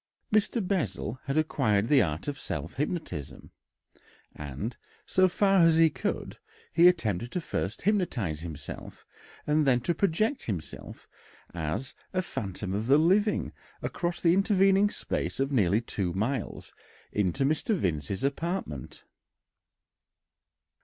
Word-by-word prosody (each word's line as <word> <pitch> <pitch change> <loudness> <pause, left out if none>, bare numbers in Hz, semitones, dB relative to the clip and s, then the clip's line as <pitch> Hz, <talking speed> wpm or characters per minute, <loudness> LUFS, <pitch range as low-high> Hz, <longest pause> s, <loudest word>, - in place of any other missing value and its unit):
Mr. 215 -1 +2
Bessel 130 - -2
had 140 +2 -1
acquired 115 -9 +2
the 140 -1 +5
art 80 - -2
of 140 -2 -3
self 75 - -4
hypnotism, 135 - -4 0.8
and, 75 - -5 0.3
so 185 0 +4
far 195 +1 +3
as 165 -1 +5
he 165 -1 +6
could, - - -3 0.3
he 170 +1 +7
attempted 120 - +1
first 105 - -2
to - - -14
hypnotise 135 - 0
himself 80 -3 -8 0.4
and 150 0 +2
then 125 -2 +4
to 170 - 0
project 205 - 0
himself 90 -8 -6 0.5
as 85 - -3 0.2
a 185 0 +1
"phantom 95 - -4
of 105 +3 -2
the 140 +2 +6
living" 195 +7 +2 0.3
across 175 -1 -2
the 170 -1 +4
intervening 195 +1 +4
space - - -3
of 135 +1 0
nearly 105 -4 +3
two 95 -6 -2
miles 110 +5 -3 0.4
into 105 +5 +1
Mr. 155 +8 +1
Vincey's 90 - -2
apartment. 140 - -3
135 Hz, 125 wpm, -28 LUFS, -, 0.8 s, he